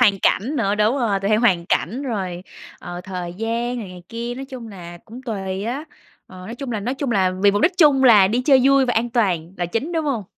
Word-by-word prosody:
hoàn 205 -5 +4
cảnh 265 +9 +1
nữa 205 -4 +1
đúng 215 +5 +2
rồi, 210 -6 0
tùy 200 - -1
theo 215 0 +3
hoàn 185 -8 +2
cảnh, 235 - -1
rồi, 190 -9 -4 0.4
ờ, 175 0 -7
thời 180 -2 -6
gian 235 +4 -2
này 210 - -6
này 180 -1 -11
kia, 235 +1 -5
nói 265 +2 -6
chung 260 -4 -9
là 175 -4 -10
cũng 240 +4 -11
tùy 195 -5 -4
á. 265 +6 -3 0.4
Ờ, 185 - -14
nói 230 - -6
chung 260 0 -6
là 215 - -2
nói 245 +6 -2
chung 275 -1 -3
là 190 -5 +2
vì 205 - +6
mục 205 +1 -1
đích 360 - +4
chung 285 -5 +5
là 210 -6 +7
đi 240 +4 0
chơi 270 -1 +5
vui 275 0 +5
và 245 - +1
an 235 +2 0
toàn 185 -8 0
là 175 - -2
chính, 230 - -3
đúng 320 -1 -1
hông? 255 -8 -2
225 Hz, 255 wpm, -21 LUFS, 190-255 Hz, 0.4 s, là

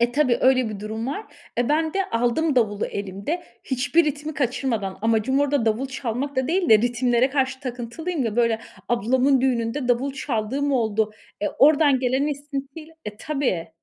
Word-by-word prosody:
E, 240 +1 +2
tabii 260 -4 +3
öyle 255 -2 +4
bir 210 -2 -6
durum 220 +2 -4
var. 400 +11 -4 0.3
Eee, 245 - +1
ben 315 +2 +1
de 390 -1 +1
aldım 245 +6 +1
davulu 210 -3 +1
elimde, 200 - -4 0.2
hiçbir 285 +6 +2
ritmi 300 +1 -3
kaçırmadan. 240 -7 -1
Amacım 230 +5 +2
orada 285 -4 +1
davul 225 +5 +1
çalmak 265 +1 -4
da 260 +2 0
değil 355 0 +1
de, 220 - +8
ritimlere 245 +2 +2
karşı 265 -1 0
takıntılıyım 260 +5 -4
ya; 225 0 -2
böyle 230 -2 +2 0.3
ablamın 255 +3 +2
düğününde 250 0 0
davul 260 +3 +1
çaldığım 270 +2 -2
oldu. 220 -3 +1 0.3
Eee, 205 - 0
oradan 290 -2 +5
gelen 260 +3 +1
esintiyle 285 +2 -6
E, 210 0 -6
tabii. 270 - -2
260 Hz, 165 wpm, -23 LUFS, 230-285 Hz, 0.3 s, de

